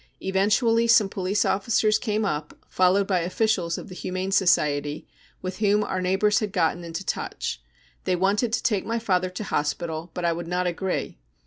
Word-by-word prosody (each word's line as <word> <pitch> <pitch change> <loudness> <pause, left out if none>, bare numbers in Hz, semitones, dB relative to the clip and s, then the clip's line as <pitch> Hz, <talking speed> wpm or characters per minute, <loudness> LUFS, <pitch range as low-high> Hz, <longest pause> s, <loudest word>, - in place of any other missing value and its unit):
Eventually 210 +4 +2
some 225 -4 +5
police 195 +2 0
officers 215 +1 +2
came 215 -1 -1
up, 150 -4 -3
followed 185 +2 +3
by 190 -2 +1
officials 180 -1 0
of - - -8
the 185 - -10
Humane 185 +1 -4
Society, 150 -6 +1 0.4
with 185 +1 -5
whom 210 0 +3
our 190 -2 -2
neighbours 190 +3 +2
had 210 -2 -3
got 175 -5 +1
into 170 +2 -6
touch. - - -3 0.4
They 185 - +2
wanted 200 +6 +1
to - - 0
take 210 -5 +1
my 230 +1 -2
father 185 -5 0
to 185 +4 -6
hospital, 160 0 -2
but 180 - -2
I 170 - +2
would 170 0 -6
not 180 +1 -1
agree. 180 +1 -3
190 Hz, 180 wpm, -25 LUFS, 175-210 Hz, 0.4 s, some